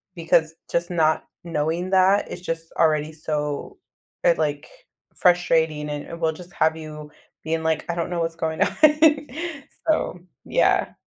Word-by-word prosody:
because 160 -1 +2 0.2
just 170 +1 0
not 160 -2 +2 0.2
knowing 165 +2 -1
that 190 +1 +4
is 175 - -6
just 165 -2 -4
already 155 -2 +2
so, 150 - -3 0.5
uh, - - +6
like, - - -2 0.5
frustrating, 160 -4 +2
and 145 0 -4
it 170 - -8
will 160 -1 +1
just 175 +2 -12
have 160 0 +2
you 150 -1 -9 0.3
being, 160 +1 -1
like, 160 -1 0
"I 170 - -1
don't 170 -1 -2
know 175 -1 -2
what's 165 0 -2
going 160 -1 -3
on. - - +2 1.1
“So, 310 - +1 0.3
yeah, - - +2
160 Hz, 150 wpm, -23 LUFS, 155-175 Hz, 1.1 s, uh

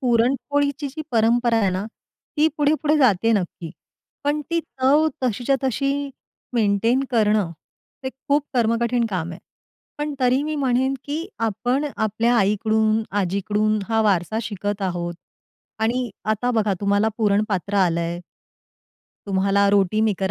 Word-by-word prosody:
पुरणपोळीची 275 +4 +1
जी 310 +3 -6
परंपरा 235 +1 +3
आहे 195 -4 +2
ना, 185 +3 -2 0.5
ती 310 +2 +4
पुढे-पुढे 300 +1 +2
जाते 225 -6 +3
आहे - - +4
नक्की. 170 -2 -7 0.5
पण 295 +1 +1
ती 335 0 +1
चव 295 +1 +2
तशीच्या 250 +3 +1
तशी 275 +2 -1 0.4
मेंटेन 230 +4 +2
करणं, 215 -5 +2 0.5
हे 260 - -2
खूप 280 +2 -1
कर्मकठीण 235 0 +1
काम 175 -3 -2
आहे. - - -9 0.6
पण 295 -1 -2
तरी 255 +2 +3
मी 305 0 -2
म्हणेन, 265 0 +1
की 310 +4 -3
आपण 245 +6 0
आपल्या 220 +3 +1
आईकडून, 215 +2 +2 0.2
आजीकडून 205 +3 0
हा 225 -1 +2
वारसा 200 +1 +1
शिकत 205 -1 -4
आहोत. 175 -2 -2 0.6
आणि 235 +1 0
आता 215 +3 0
बघा, 215 -4 +1
तुम्हाला 205 +2 +2
पुरण 205 -1 +3
पात्र 200 +1 -2
आलंय 170 -2 +1 1.1
तुम्हाला 200 +1 +2
रोटी 200 +1 +2
मेकर 200 -3 0
225 Hz, 135 wpm, -22 LUFS, 200-265 Hz, 1.1 s, ती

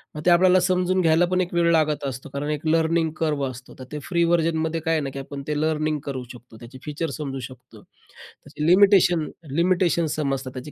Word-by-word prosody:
मग 150 - -5
ते - - +5
आपल्याला 185 +1 +5
समजून 185 0 +1
घ्यायला 165 +1 +4
पण 185 0 +2
एक 180 -1 -4
वेळ 170 0 +2
लागत 155 -2 +1
असतो. 130 +1 -6
कारण 140 +1 -3
एक 150 +1 -4
लर्निंग 165 0 +2
कर्व 150 -3 -1
असतो. 130 0 -11
तर - - -7
ते 150 - -5
फ्री 170 +1 0
व्हर्जनमध्ये 165 -1 +1
काय 165 +1 0
आहे 160 - +1
ना, 140 - -3
की 140 - -5
आपण 140 +1 -7
ते 150 -1 -1
लर्निंग 155 -1 0
करू 130 -2 -4
शकतो, 120 -2 -14
त्याचे 120 +3 -12
फीचर 150 +2 -3
समजू 135 -3 -5
शकतो, 130 0 -11
त्याची 150 - -11
लिमिटेशन 180 -3 +5 0.3
लिमिटेशन 170 +1 +2
समजतात, 135 -3 -2
त्याची 130 +3 -8
155 Hz, 205 wpm, -23 LUFS, 140-170 Hz, 0.3 s, ते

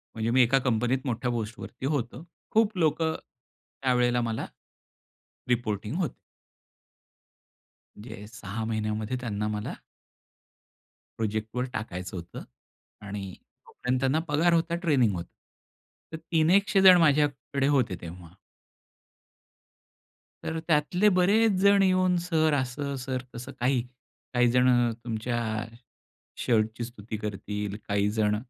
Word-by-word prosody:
म्हणजे 110 +1 -1
मी 130 - +5
एका 135 +3 +3
कंपनीत 125 +3 +1
मोठ्या 125 0 -1
पोस्टवरती 115 +3 -5
होतो. 140 +1 -2 0.3
खूप 215 -3 +2
लोकं 160 -1 +2
त्यावेळेला 125 -1 -2
मला 115 -1 -2 1.0
रिपोर्टिंग 115 - -1
होते. 165 -9 -2 1.8
म्हणजे 105 -1 -9
6 110 -1 -6
महिन्यामध्ये 110 +2 -2
त्यांना 105 -3 -2
मला 105 0 -3 1.5
प्रोजेक्टवर 110 +3 -2
टाकायचं 95 -4 -5
होतं 85 +1 -8 0.6
आणि 100 -2 -6 0.3
तोपर्यंत 125 +1 -2
त्यांना 135 +4 +2
पगार 160 +4 +3
होता, 170 0 +1
ट्रेनिंग 140 - +2
होतं. 85 0 -5 0.9
तर - - -3
तीन 160 0 +1
एकशेजण 195 -1 +6
माझ्याकडे 145 -3 +2
होते 125 -10 +2
तेव्हा. 85 0 -10 2.1
तर 160 0 -3
त्यातले 175 +6 +3
बरेच 210 +4 +4
जण 200 0 +6
येऊन 185 -1 +3
सर 160 -3 +1
असं, 140 +1 -2
सर 130 -1 -3
तसं, 120 - -7
काही 125 0 +2 0.5
काही 125 0 +4
जण 125 -1 +4
तुमच्या 120 +1 -2 1.1
शर्टची 110 0 +1
स्तुती 110 -2 -7
करतील, 105 -1 -4
काही 100 0 +1
जण 105 -1 +1
125 Hz, 110 wpm, -27 LUFS, 110-155 Hz, 2.1 s, एकशेजण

